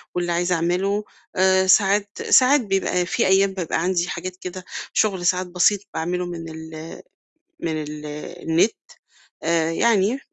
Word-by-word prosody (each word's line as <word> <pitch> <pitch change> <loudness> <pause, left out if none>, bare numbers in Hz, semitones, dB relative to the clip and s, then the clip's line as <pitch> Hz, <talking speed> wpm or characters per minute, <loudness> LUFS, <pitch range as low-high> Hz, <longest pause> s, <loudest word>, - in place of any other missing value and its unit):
واللي 175 -1 -1
عايزة 175 +1 +1
أعمله، 185 +5 0 0.3
آآ 190 0 +3
ساعات 200 +1 +4 0.2
ساعات 265 +2 +6
بيبقى 195 -3 0
في 185 - 0
أيام 195 0 +3
بابقى 170 -3 -2
عندي 180 -1 0
حاجات 180 +1 -5
كده 185 0 -8 0.3
شُغل 190 -5 +1
ساعات 180 0 +1
بسيط 180 +3 +3
باعمله 180 +2 -2
من 165 -2 -6
ال 160 0 -9 0.6
من 160 -2 -2
ال 150 0 -8 0.4
النِت، 170 +7 +3 0.7
آآ 165 0 +1
يعني 225 +5 +2
180 Hz, 140 wpm, -22 LUFS, 170-195 Hz, 0.7 s, ساعات